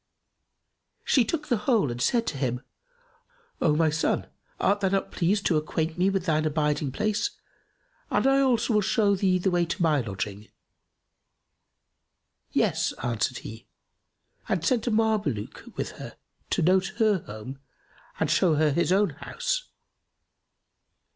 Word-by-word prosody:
She 260 - +4
took 295 +6 -3
the 240 - +2
whole 215 - +3
and 120 +1 -5
said 235 - +2
to 140 - -3
him, 125 -2 -1 1.0
"O 150 -2 +3
my 160 0 +3
son, 160 +2 0 0.3
art 205 +1 +2
thou 195 -2 +1
not 195 0 -1
pleased 195 +4 0
to 165 - +3
acquaint 160 +1 -2
me 185 +2 +2
with 195 -2 -1
thine 155 -3 +2
abiding 150 -2 0
place 215 - 0 0.8
and - - +1
I 270 0 +4
also 255 -3 +2
will 210 - +4
show 205 +1 +2
thee 185 -1 +2
the 185 +1 0
way 175 -1 +2
to 170 - -3
my 155 -4 +3
lodging?" 105 -1 -5 2.0
"Yes," - - +1
answered 120 +1 -1
he 110 +1 -9 0.8
and 170 -3 0
sent 245 +2 +1
a - - +4
Mameluke 215 - 0
with - - -3
her - - -8 0.3
to - - +1
note 190 +4 +2
her 215 -4 +3
home 110 +6 -8 0.6
and - - +1
show 170 -4 +3
her 150 0 +3
his 170 +4 +1
own 195 -1 +3
house. - - -3
175 Hz, 150 wpm, -26 LUFS, 150-210 Hz, 2.0 s, She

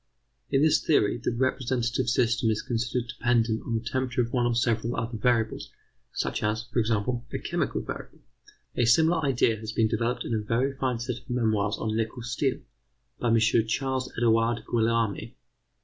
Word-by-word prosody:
In 135 +2 +3
this 155 0 +3
theory, 120 -7 +2
the - - +1
representative 125 0 0
system 120 -1 +2
is 110 0 -1
considered 120 0 -2
dependent 115 -2 +1
on 115 - -3
the 110 - -2
temperature 130 -2 0
of 120 - -6
one 120 -2 +2
or 120 - 0
several 115 0 0
other 115 +1 -3
variables, 110 0 0 0.4
such - - -2
as, 105 +1 0
for 120 +1 -2
example, 115 +2 0
a - - -2
chemical - - -2
variable. - - -8 0.5
A 120 - +2
similar 160 +7 +4
idea 125 -5 +2
has 110 0 -6
been 110 0 +3
developed 120 +3 -1
in - - -2
a 110 - +1
very 115 +6 0
fine 130 -2 -1
set 120 +1 -4
of - - -25
memoirs 110 -4 +1
on 110 0 -2
nickel 115 +2 -2
steel, 125 +2 -1 0.6
by - - -1
M. 115 0 +4
Ch. 110 0 +3 0.3
Ed. 120 -3 +1
Guillaume. 115 -3 0
120 Hz, 175 wpm, -27 LUFS, 115-125 Hz, 0.6 s, similar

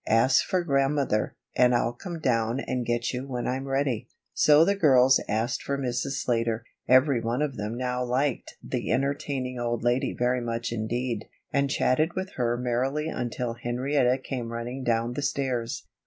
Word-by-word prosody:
Ask 115 +4 +4
for 185 -1 0
Grandmother, 140 -6 +1 0.2
and 125 -1 +4
I'll 120 0 +1
come 170 +7 -7
down 115 -3 +1
and 125 -3 -3
get 120 +1 0
you 130 +2 -4
when 125 -2 -3
I'm 135 +2 -2
ready." 135 -4 -1 0.3
So 150 +2 +6
the 200 - +3
girls 135 -8 +5
asked 115 +3 0
for 140 - -2
Mrs. 130 +1 -2
Slater 115 -2 0 0.2
every 130 -1 +5
one 120 +5 0
of 140 -3 -2
them 105 +3 -4
now 125 0 -1
liked 130 +2 -1
the - - -3
entertaining 135 -2 -1
old 120 -1 -2
lady 125 +2 +1
very 125 +1 +1
much 115 0 -3
indeed 115 0 -2 0.3
and 140 0 +2
chatted 155 +4 +1
with 190 +1 -3
her 120 -5 0
merrily 130 +5 -1
until 120 -3 -3
Henrietta 125 +2 +1
came 125 -3 -5
running 120 +3 -5
down 115 0 0
the 145 - -3
stairs. 130 -4 -2
125 Hz, 170 wpm, -27 LUFS, 120-135 Hz, 0.3 s, So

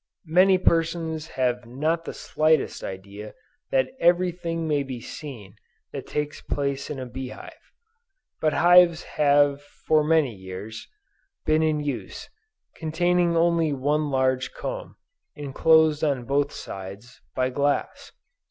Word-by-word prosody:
Many 185 +4 +5
persons 165 -2 0
have 125 -2 0
not 155 +7 -1
the - - -5
slightest 155 0 +1
idea 100 +2 -8 0.3
that 130 -1 +1
every 175 +1 +3
thing 165 -2 -4
may 150 -2 +1
be 130 -3 -6
seen 115 -6 -9 0.3
that - - -7
takes 150 0 -3
place 140 -1 -3
in 150 - -4
a 130 - -5
bee 130 +2 -6
hive. - - -12 0.7
But 155 -1 +1
hives 175 -1 +5
have 145 -1 +2
for 150 +1 0
many 155 -5 +2
years, 95 +3 -8 0.6
been 155 0 +3
in 155 -1 +1
use, 125 -10 -5 0.4
containing 175 +1 +1
only 165 -2 +2
one 145 +3 0
large 130 -1 0
comb, - - -6 0.4
enclosed 155 +2 +3
on 140 -5 0
both 140 +2 +1
sides, 100 +5 -9
by 130 0 0
glass. 145 +2 -1
145 Hz, 130 wpm, -25 LUFS, 130-160 Hz, 0.7 s, Many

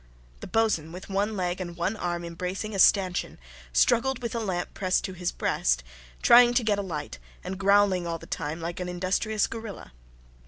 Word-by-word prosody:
The - - -8
boatswain, 215 -9 +1
with 180 +3 -9
one 205 +2 0
leg 180 0 -2
and 175 -2 -6
one 180 +5 -1
arm 175 -4 -3
embracing 180 +5 -4
a 195 - -3
stanchion, 185 -2 +3 0.3
struggled 235 - +3
with 235 - -3
a 235 - -1
lamp 185 -5 -3
pressed 185 -1 0
to 190 - -4
his 180 -1 -2
breast, - - 0 0.4
trying 240 0 +7
to 245 - +3
get 210 -2 +1
a - - 0
light, 150 - -5 0.2
and 190 - -4
growling 195 -2 +3
all 165 0 -2
the - - -13
time 155 +1 -4
like 170 +1 -5
an 180 0 -3
industrious 190 +4 0
gorilla. 225 -3 -8
185 Hz, 190 wpm, -27 LUFS, 175-210 Hz, 0.4 s, trying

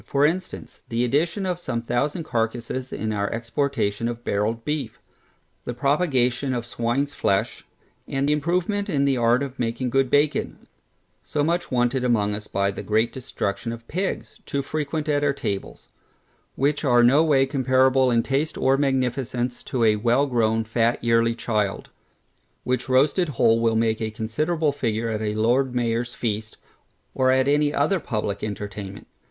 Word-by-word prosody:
For 140 +1 +2
instance, 180 +4 -3
the 115 +1 0
addition 170 - 0
of 180 -2 -2
some 115 -9 -3
thousand 140 +8 -1
carcasses 120 0 -2
in 110 0 -2
our 100 -1 -1
exportation 115 -2 -1
of 120 0 -5
barrelŌĆÖd 110 +3 -1
beef: 150 +2 -3 0.6
the 120 - -5
propagation 135 -2 +1
of 120 -1 -3
swineŌĆÖs 120 +5 -1
flesh, 100 -7 -1 0.4
and 135 +1 -1
improvement 175 +7 0
in 140 -2 +1
the 135 -2 +2
art 120 +2 +3
of 135 -1 -7
making 120 +1 -1
good 135 0 +2
bacon, 145 +2 +1 0.6
so 145 - -2
much 170 +3 0
wanted 125 +1 +1
among 105 -4 +2
us 105 0 -6
by 100 0 0
the - - -6
great 110 +2 +1
destruction 120 -3 -3
of 115 0 -9
pigs, 190 +4 -3
too 140 -1 -1
frequent 155 +1 -3
at 145 -1 +1
our 145 -1 +2
tables; 105 -9 -5 0.7
which 145 +3 0
are 120 -4 +4
no 135 +6 +5
way 140 -4 +4
comparable 130 -1 +3
in 115 -1 +2
taste 140 +4 -1
or 135 +1 +3
magnificence 125 -2 -1
to 125 -3 -2
a 110 -1 +4
well 120 +6 +2
grown, 115 -4 +1
fat 115 +2 0
yearling 115 0 +3
child, 105 -4 -2 0.7
which 125 0 -2
roasted 145 +7 +3
whole 115 0 +4
will 115 -1 +2
make 110 0 +1
a 110 - -1
considerable 150 +9 -1
figure 115 -4 -2
at 110 -1 -2
a 105 -1 -2
Lord 125 +4 +2
MayorŌĆÖs 120 0 -1
feast, 110 -1 -3 0.6
or 130 -1 +2
any 140 +3 +3
other 155 +7 +1
publick 105 -8 -3
entertainment. 100 -1 -6
125 Hz, 160 wpm, -24 LUFS, 115-140 Hz, 0.7 s, no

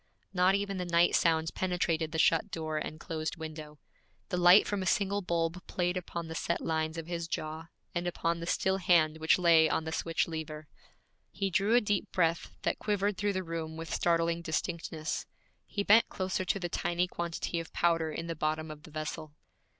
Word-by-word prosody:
Not 185 +1 +4
even 200 -1 -2
the 180 - -2
night 170 0 +3
sounds 160 -1 +2
penetrated 170 -3 -1
the 160 - -3
shut 165 +4 +3
door 155 -3 -3
and 155 - -6
closed 160 -1 -4
window. 155 -2 -8 0.5
The 180 - -1
light 180 +3 +7
from 205 -2 -2
a 185 - -2
single 200 -1 +1
bulb 170 -1 -1
played 180 0 -1
upon 170 -2 -4
the 160 - -6
set 170 +1 -1
lines 160 0 -1
of 165 - -4
his 170 -1 -4
jaw, 160 0 -4 0.3
and 175 0 -2
upon 170 -1 -1
the 170 - -6
still 190 +1 +1
hand 165 -4 +3
which 160 +1 +4
lay 165 -3 +5
on 160 - 0
the 160 - -4
switch 165 +1 0
lever. 155 -2 -6 0.6
He 195 -1 -2
drew 205 +5 +3
a 245 - +6
deep 205 -2 -1
breath 165 -2 +1
that - - 0
quivered 205 -1 0
through 205 +1 0
the 185 0 -2
room 165 -2 -5
with 165 0 -5
startling 170 0 +1
distinctness. 160 0 -3 0.4
He 200 - -2
bent 215 +3 +6
closer 185 0 -2
to 200 - +1
the 175 - -2
tiny 175 +1 0
quantity 170 -1 -3
of 165 - -7
powder 165 -2 +1
in 165 +2 -4
the 170 - -3
bottom 155 0 -2
of 150 -1 -10
the 155 - -13
vessel. 155 0 -5
170 Hz, 195 wpm, -31 LUFS, 160-180 Hz, 0.6 s, light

